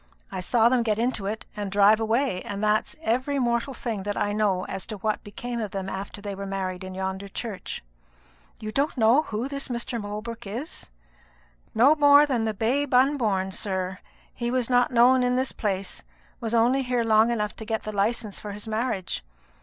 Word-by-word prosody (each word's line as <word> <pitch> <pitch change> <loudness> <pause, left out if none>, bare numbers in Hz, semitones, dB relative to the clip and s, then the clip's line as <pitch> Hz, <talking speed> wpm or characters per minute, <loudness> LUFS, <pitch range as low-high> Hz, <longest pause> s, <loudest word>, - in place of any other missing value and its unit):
I 190 - -4
saw 225 +5 +3
them 245 0 +3
get 215 -3 +1
into 230 -4 -1
it 215 +2 -4
and 205 -2 -4
drive 205 +2 +5
away; 225 -3 +1
and 200 +1 -5
that's 215 0 +1
every 260 +4 0
mortal 240 +1 0
thing 225 -4 -3
that 205 +1 -3
I 205 0 0
know 200 -3 +1
as 190 -1 -6
to 215 - -5
what 215 +2 -1
became 235 +3 -5
of 215 - -3
them 195 0 -4
after 200 +1 -6
they 200 -1 -4
were 195 0 -6
married 190 -1 -3
in 185 0 -7
yonder 190 +1 -3
church." 200 - -5 0.8
"You 215 0 -5
don't 280 +5 0
know 230 +5 +5
who 225 -3 -3
this 275 0 -4
Mr. 235 -1 -3
Holbrook 210 +2 -6
is?" 240 - -6 0.9
"No 255 +7 +7
more 290 -1 +7
than 245 -6 0
the 220 - 0
babe 260 +7 0
unborn, 230 -8 +2
sir. 190 -1 -2 0.3
He 240 -1 -3
was 255 0 0
a 245 0 +6
stranger 250 +1 +5
in 250 0 +2
this 260 +1 0
place, 195 -3 -3 0.4
was 230 -1 -2
only 245 +4 +4
here 245 -2 0
long 220 0 +4
enough 210 -3 -1
to 220 - -6
get 220 0 -2
the 215 -1 -5
license 210 +1 -1
for 205 -1 -6
his 210 +2 -8
marriage. 220 - -2
220 Hz, 195 wpm, -26 LUFS, 200-245 Hz, 0.9 s, No